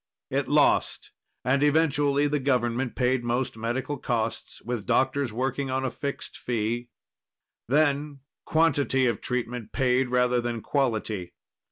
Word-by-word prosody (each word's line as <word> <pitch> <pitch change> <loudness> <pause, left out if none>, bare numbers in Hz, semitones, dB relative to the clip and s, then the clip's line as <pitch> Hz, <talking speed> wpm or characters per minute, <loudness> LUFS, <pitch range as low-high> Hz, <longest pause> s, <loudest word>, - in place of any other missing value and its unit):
It - - 0
lost, - - +2 0.3
and 130 +2 +2
eventually 145 -1 +3
the 150 0 0
government 125 -2 0
paid 125 -1 +1
most 120 +1 -1
medical 120 +5 -3
costs, 115 -3 -3
with 120 -3 -4
doctors 135 -1 +1
working 130 +4 -2
on 130 +1 -1
a 130 - -1
fixed 140 +1 -6
fee. 120 +1 -2 0.8
Then 145 +1 +1 0.2
quantity 145 -5 +2
of 115 -4 0
treatment 125 -3 -3
paid, 130 -1 +2
rather 125 0 +2
than 120 -1 -3
quality. 110 -10 -1
130 Hz, 130 wpm, -26 LUFS, 120-140 Hz, 0.8 s, eventually